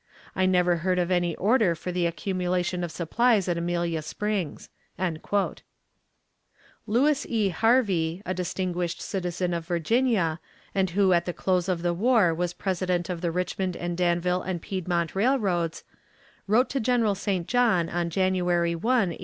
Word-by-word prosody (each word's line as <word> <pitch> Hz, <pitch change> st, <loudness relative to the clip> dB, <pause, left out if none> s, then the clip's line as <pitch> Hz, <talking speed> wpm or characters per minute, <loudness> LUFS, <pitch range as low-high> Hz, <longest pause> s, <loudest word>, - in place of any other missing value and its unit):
I 185 Hz, 0 st, +2 dB
never 180 Hz, -1 st, +3 dB
heard 180 Hz, +2 st, 0 dB
of 180 Hz, 0 st, 0 dB
any 175 Hz, -2 st, +1 dB
order 210 Hz, -4 st, +2 dB
for 180 Hz, +3 st, -5 dB
the 175 Hz, -1 st, +1 dB
accumulation 180 Hz, 0 st, -2 dB
of 170 Hz, -, -3 dB
supplies 200 Hz, +5 st, +1 dB
at 175 Hz, -, +1 dB
Amelia 170 Hz, -1 st, -1 dB
Springs." 195 Hz, 0 st, -3 dB, 2.2 s
Lewis 270 Hz, +7 st, +2 dB
E. 215 Hz, -4 st, +1 dB
Harvie, 190 Hz, -4 st, +1 dB
a 185 Hz, -, -1 dB
distinguished 180 Hz, -1 st, -2 dB
citizen 180 Hz, -2 st, -2 dB
of 165 Hz, -1 st, -4 dB
Virginia, 175 Hz, -1 st, +1 dB, 0.3 s
and 190 Hz, -1 st, +1 dB
who 190 Hz, +1 st, +3 dB
at 170 Hz, 0 st, +2 dB
the 175 Hz, -, -3 dB
close 185 Hz, 0 st, 0 dB
of 175 Hz, -2 st, -1 dB
the 175 Hz, -1 st, +1 dB
war 210 Hz, -2 st, +3 dB
was 175 Hz, +1 st, -1 dB
President 180 Hz, -2 st, -1 dB
of 170 Hz, -2 st, -5 dB
the 175 Hz, -, 0 dB
Richmond 180 Hz, +1 st, -2 dB
and 175 Hz, 0 st, -3 dB
Danville 180 Hz, +1 st, +1 dB
and 185 Hz, -2 st, -3 dB
Piedmont 175 Hz, -2 st, -2 dB
Railroads, 195 Hz, -7 st, 0 dB, 0.6 s
wrote 230 Hz, +6 st, +3 dB
to 275 Hz, -, 0 dB
General 235 Hz, -3 st, +2 dB
St. 190 Hz, -3 st, -2 dB
John 230 Hz, -9 st, +2 dB
on 175 Hz, 0 st, -2 dB
January 175 Hz, -1 st, +1 dB
1, 165 Hz, -, -6 dB
1876. 225 Hz, -8 st, +1 dB
180 Hz, 155 wpm, -26 LUFS, 170-200 Hz, 2.2 s, never